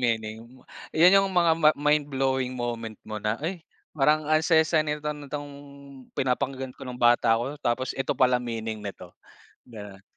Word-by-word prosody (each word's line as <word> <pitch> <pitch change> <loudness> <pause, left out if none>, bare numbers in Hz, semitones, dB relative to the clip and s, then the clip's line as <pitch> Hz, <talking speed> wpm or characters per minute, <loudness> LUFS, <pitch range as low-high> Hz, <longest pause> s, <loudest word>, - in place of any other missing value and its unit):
meaning. 110 -3 -1 0.6
'Yan 180 +4 +7
yung 195 - 0
mga 175 -3 +3
ma 155 0 +7
mindblowing 135 -3 0
moment 115 -2 -4
mo 105 -1 -6
na, 105 +2 -1
"Ay 165 +6 -4 0.3
parang 150 +1 +2
ang 155 0 +3
saya-saya 160 -1 +3
nito 150 0 -4
nitong 145 0 -7 0.7
pinapakinggan 130 0 -2
ko 135 - -10
nung 125 -1 -8
bata 120 -1 +4
ako 135 +6 -4
tapos 130 +1 -1
eto 135 - -2
pala 125 -1 +3
meaning 115 -2 -5
nito." 95 -3 -9 0.5
Ganun. 105 -4 -11
130 Hz, 155 wpm, -26 LUFS, 115-150 Hz, 0.7 s, Yan